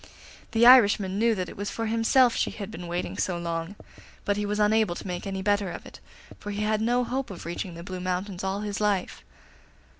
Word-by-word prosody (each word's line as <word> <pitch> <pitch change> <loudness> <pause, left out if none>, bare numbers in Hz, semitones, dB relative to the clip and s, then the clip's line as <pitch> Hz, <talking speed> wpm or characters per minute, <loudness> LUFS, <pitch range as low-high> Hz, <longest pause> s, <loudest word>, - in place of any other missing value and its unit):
The 230 +1 +4
Irishman 205 -6 +6
knew 230 0 +3
that 185 -2 -3
it - - -10
was 205 +1 -4
for 230 - -3
himself 230 +2 +3
she - - 0
had 200 -3 -7
been 175 +1 -7
waiting 175 +1 -4
so 180 -2 0
long, 170 +2 -4 0.5
but 205 - +1
he 205 0 -2
was 210 +1 -2
unable 210 -3 +3
to - - -8
make 180 0 -4
any 190 -1 -4
better 205 -1 +1
of - - -8
it, - - -12 0.4
for 205 - -7
he 205 +1 -2
had 215 0 +1
no 245 +2 +2
hope 260 +2 -3
of 185 -5 -9
reaching 175 +1 -5
the 170 - -8
Blue 185 0 -6
Mountains 185 +1 -3
all 195 +1 -2
his 210 0 -4
life. 205 -3 -1
205 Hz, 220 wpm, -26 LUFS, 185-220 Hz, 0.5 s, Irishman